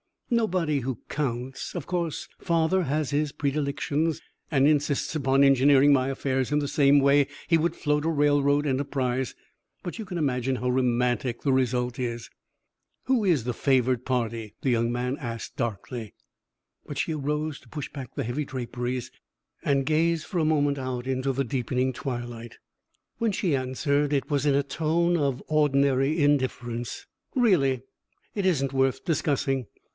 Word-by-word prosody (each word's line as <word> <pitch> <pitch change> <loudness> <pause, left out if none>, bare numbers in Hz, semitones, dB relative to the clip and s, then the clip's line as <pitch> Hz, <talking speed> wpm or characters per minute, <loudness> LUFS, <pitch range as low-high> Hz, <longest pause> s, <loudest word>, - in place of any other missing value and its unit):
"Nobody 180 -10 +1
who 130 -2 -4
counts. 130 -2 -3
Of 170 - -4
course, 170 -4 -2
father 170 +2 +2
has 150 -2 -1
his 145 0 0
predilections 145 +2 -1 0.3
and 140 -3 +3
insists 145 -1 +1
upon 135 -2 +3
engineering 140 +1 +6
my 130 -1 +2
affairs 135 -1 -1
in 150 - +3
the 145 -1 -2
same 145 -2 +5
way 140 0 +4 0.2
he 165 - +4
would 165 +1 0
float 150 -1 0
a - - +2
railroad 145 -1 +3
enterprise, 130 -2 -1 0.5
but 175 +6 -6
you 220 - -4
can 185 -2 -5
imagine 130 -4 0
how 125 0 -2
romantic 125 -1 +1
the 140 - +1
result 125 -1 0
is." 120 -2 -3 0.7
"Who 255 -5 +1
is 165 - +3
the 125 +1 -2
favored 130 -1 +1
party?" 115 -4 -2
the 130 - +1
young 115 0 +2
man 125 +2 -2
asked, 115 -6 -6
darkly. 115 0 -4 0.7
But - - -6
she 160 - 0
arose 150 0 -2
to 125 - -21
push 150 0 -5
back 135 -3 -8
the 140 - -1
heavy 125 +6 -2
draperies 125 -1 -4 0.5
and 140 -1 +2
gaze 160 +2 +2
for 180 - -3
a 160 - +2
moment 145 -2 +2
out 130 -1 -4
into 130 +1 0
the 135 +2 0
deepening 125 +1 -1
twilight. 120 -3 -6 0.6
When 230 -3 0
she 175 -6 +1
answered, 140 +3 0
it 140 +1 -1
was 145 -1 +1
in 140 - +4
a 140 - +2
tone 165 +5 +1
of 140 -4 -1
ordinary 140 0 +2
indifference. 125 -5 0 0.3
"Really 160 - +3 0.5
it 200 -2 -2
isn't 140 -7 +1
worth 135 -1 +1
discussing. 140 - 0
140 Hz, 160 wpm, -26 LUFS, 125-150 Hz, 0.7 s, engineering